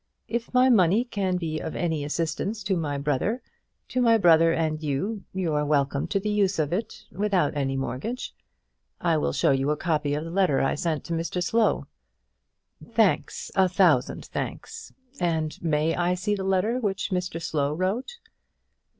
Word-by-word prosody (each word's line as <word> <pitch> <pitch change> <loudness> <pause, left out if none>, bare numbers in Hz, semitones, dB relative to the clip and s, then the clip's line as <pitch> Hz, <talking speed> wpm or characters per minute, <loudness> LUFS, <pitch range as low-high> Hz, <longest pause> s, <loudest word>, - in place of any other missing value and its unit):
If 235 0 -3
my 255 0 +5
money 210 -2 +4
can 195 -6 -1
be 160 -3 -3
of 160 - -5
any 160 -4 -1
assistance 165 +8 -2
to 190 0 0
my 150 -4 -2
brother 150 - -1 0.5
to 255 - 0
my 230 -2 +5
brother 165 -4 +5
and 155 -1 -1
you 185 +8 -2
you 185 -4 -1
are 150 0 +1
welcome 140 -2 +1
to 195 - 0
the 210 +2 -2
use 200 -2 +1
of 155 0 0
it, 215 +5 -4
without 190 -7 0
any 135 -2 -1
mortgage. 140 - -4 0.7
I 165 -2 +2
will 150 - 0
show - - +2
you 135 +1 +1
a 150 - +1
copy 150 -3 0
of 150 - -3
the 165 - -7
letter 180 -6 +2
I 135 - +1
sent 155 -1 -2
to 170 - -4
Mr 165 +2 -2
Slow." 225 +3 +1 1.0
"Thanks; 225 -4 0
a 190 -2 +3
thousand 175 -9 +2
thanks! 455 0 -6 0.3
and 160 -3 -1
may 160 0 +1
I 175 +1 +1
see 205 +3 -1
the 195 -2 -2
letter 195 +6 +1
which 200 -3 -2
Mr 180 -2 -2
Slow 150 -4 -1
wrote?" 210 - -2
175 Hz, 175 wpm, -26 LUFS, 155-200 Hz, 1.0 s, my